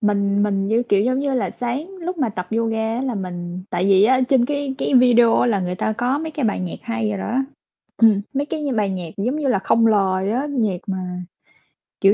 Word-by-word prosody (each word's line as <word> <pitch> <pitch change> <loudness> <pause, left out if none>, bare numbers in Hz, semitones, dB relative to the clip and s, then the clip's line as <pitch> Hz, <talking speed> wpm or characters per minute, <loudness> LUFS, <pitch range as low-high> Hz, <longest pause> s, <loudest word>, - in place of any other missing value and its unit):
Mình 200 -1 +1
mình 195 -1 0
như, 230 +3 +2
kiểu, 200 - +3
giống 255 +3 +1
như 280 -1 -1
là, 250 - 0
sáng 250 +8 -4
lúc 350 +1 -4
mà 265 -5 +1
tập 180 -4 -5
yoga 225 0 0
á 245 - -2
là, 260 -3 -2
mình 180 -2 -5
tại 175 +1 -1
vì 195 0 +5
á 255 +3 +4
trên 260 -3 +4
cái 285 -2 -2
cái - - -1
video 240 -2 +5
á - - +3
là 205 -5 +1
người 180 0 -2
ta 220 - -1
có 245 +5 0
mấy 320 +1 -4
cái 290 -4 -3
bài 210 - 0
nhạc 180 -2 -4
hay 230 -2 -2
rồi 200 - -3
đó, 235 +6 -2 0.6
ừm, 220 -3 +5
mấy 280 +1 -1
cái 300 0 -4
bài 210 -2 +1
nhạc, 180 -3 -4
giống 240 +8 -1
như 295 -3 -1
là, 200 - +2
không 230 +3 +3
lời 195 -2 +1
á, 255 +5 -1
nhạc 220 -9 0
mà, 190 -1 -2 1.0
kiểu, 195 +1 +6
225 Hz, 235 wpm, -21 LUFS, 195-255 Hz, 1.0 s, kiểu